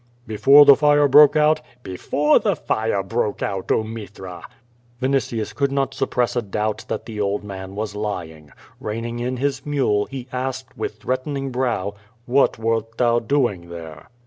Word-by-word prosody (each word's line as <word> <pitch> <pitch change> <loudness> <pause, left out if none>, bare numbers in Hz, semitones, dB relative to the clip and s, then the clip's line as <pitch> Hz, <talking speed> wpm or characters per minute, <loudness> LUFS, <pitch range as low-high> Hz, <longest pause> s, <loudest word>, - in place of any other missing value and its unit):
'* 120 +1 -36
"Before 135 +6 +6
the 140 - +9
fire 145 +1 +4
broke 145 +2 +7
out? 155 0 +3 0.2
"Before 145 +11 +1
the 205 -4 0
fire 110 -8 -1
broke 105 +1 -2
out, 95 -2 -3
oh, - - +2
Mithra!" 105 -5 -8 0.6
Vinitius 130 -4 -1
could 140 -1 0
not 135 -1 -1
suppress 125 0 -1
a 120 - +1
doubt 105 0 -3
that - - -4
the 110 -3 -5
old 100 +1 -1
man 95 -1 -8
was 105 0 -4
lying. 85 -8 -5 0.3
Seining 115 +2 -4
in 125 +1 -2
his 135 0 -2
mule, 130 -9 +1
he 130 -2 -7
asked, 130 0 -4
with 110 -3 -4
threatening 135 +3 -3
brow: 120 -6 -1 0.3
"WTiat 135 -1 +3
wert 115 0 -2
thou 120 -1 +3
doing 115 -9 -1
there? 85 -2 -10
120 Hz, 165 wpm, -21 LUFS, 105-135 Hz, 0.6 s, the